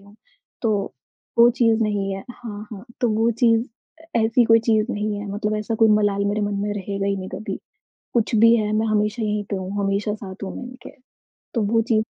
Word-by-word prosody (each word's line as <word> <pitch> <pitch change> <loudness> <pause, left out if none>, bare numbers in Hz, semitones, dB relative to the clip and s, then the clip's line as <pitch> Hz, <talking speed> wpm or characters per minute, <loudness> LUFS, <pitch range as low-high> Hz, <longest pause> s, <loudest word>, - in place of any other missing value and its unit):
हूँ, 200 +1 -19 0.5
तो 210 -3 0 0.4
वो 235 +1 +8
चीज़ 230 -2 +2
नहीं 200 -2 -1
है। 195 - -7
हाँ, 215 -3 -8
हाँ। 200 0 -8 0.2
तो 245 - +3
वो 225 +2 +2
चीज़ 230 -2 +4 0.5
ऐसी 230 +2 +3
कोई 225 0 +6
चीज़ 225 +1 +1
नहीं 210 0 -2
है, 205 - -6
मतलब 210 +1 -1
ऐसा 215 +2 -2
कोई 220 0 +4
मलाल 200 -1 +1
मेरे 205 +1 0
मन 205 0 -1
में 205 - -1
रहेगा 200 0 -3
ही 200 - 0
नहीं 190 -1 -6
कभी, 215 - -5 0.6
कुछ 235 0 +1
भी 230 +2 +7
है 210 -1 0
मैं 220 +1 +1
हमेशा 210 +1 0
यहीं 210 -1 -1
पे 200 - -1
हूँ, 190 0 -5
हमेशा 200 +2 0
साथ 195 -2 -9
हूँ, 190 - -6
मैं - - -6
इनके, 255 +1 -11 0.6
तो 230 - +1
वो 225 +2 +2
चीज़ 220 -1 +1
215 Hz, 210 wpm, -22 LUFS, 205-225 Hz, 0.6 s, वो